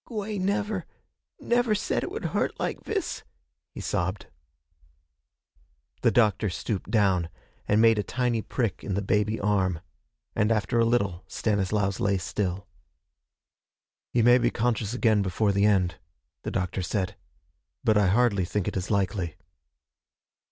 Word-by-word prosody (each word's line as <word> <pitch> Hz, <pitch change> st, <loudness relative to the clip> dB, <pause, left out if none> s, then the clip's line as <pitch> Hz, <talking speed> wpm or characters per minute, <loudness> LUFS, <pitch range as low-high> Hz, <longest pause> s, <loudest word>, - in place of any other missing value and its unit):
'Gwey 215 Hz, -3 st, -4 dB
never 200 Hz, 0 st, -1 dB, 0.5 s
never 240 Hz, -2 st, +2 dB
said 205 Hz, -, -1 dB
it -, -, -4 dB
would -, -, -5 dB
hurt -, -, -1 dB
like -, -, -3 dB
vis,' -, -, -3 dB, 0.5 s
he -, -, -9 dB
sobbed. 95 Hz, +3 st, -2 dB, 1.8 s
The -, -, +4 dB
doctor 105 Hz, -3 st, +3 dB
stooped 95 Hz, +2 st, -4 dB
down 95 Hz, -6 st, +2 dB, 0.4 s
and 105 Hz, -, +3 dB
made 115 Hz, -2 st, +5 dB
a -, -, +3 dB
tiny 120 Hz, 0 st, -1 dB
prick 110 Hz, -4 st, -2 dB
in 100 Hz, -, -2 dB
the 100 Hz, -, -1 dB
baby 105 Hz, +2 st, +1 dB
arm, 95 Hz, -4 st, +1 dB, 0.6 s
and 105 Hz, 0 st, +2 dB
after 110 Hz, +2 st, +1 dB
a 115 Hz, -, +4 dB
little 100 Hz, -7 st, 0 dB
Stanislaus 100 Hz, -2 st, 0 dB
lay 100 Hz, -1 st, +2 dB
still. 95 Hz, +1 st, -3 dB, 1.4 s
'He 120 Hz, -, +2 dB
may 120 Hz, +2 st, +6 dB
be 120 Hz, 0 st, +2 dB
conscious 115 Hz, -2 st, -1 dB
again 110 Hz, -4 st, +3 dB
before 100 Hz, +2 st, +1 dB
the 100 Hz, +1 st, +2 dB
end,' 90 Hz, -5 st, +2 dB, 0.4 s
the -, -, -4 dB
doctor 90 Hz, +1 st, -2 dB
said, 95 Hz, +3 st, -2 dB, 0.7 s
'but 110 Hz, -, +3 dB
I 105 Hz, -2 st, +4 dB
hardly 100 Hz, -1 st, +3 dB
think 95 Hz, +2 st, -2 dB
it -, -, -2 dB
is 95 Hz, 0 st, -3 dB
likely.' 95 Hz, -4 st, 0 dB
105 Hz, 145 wpm, -27 LUFS, 95-115 Hz, 1.8 s, may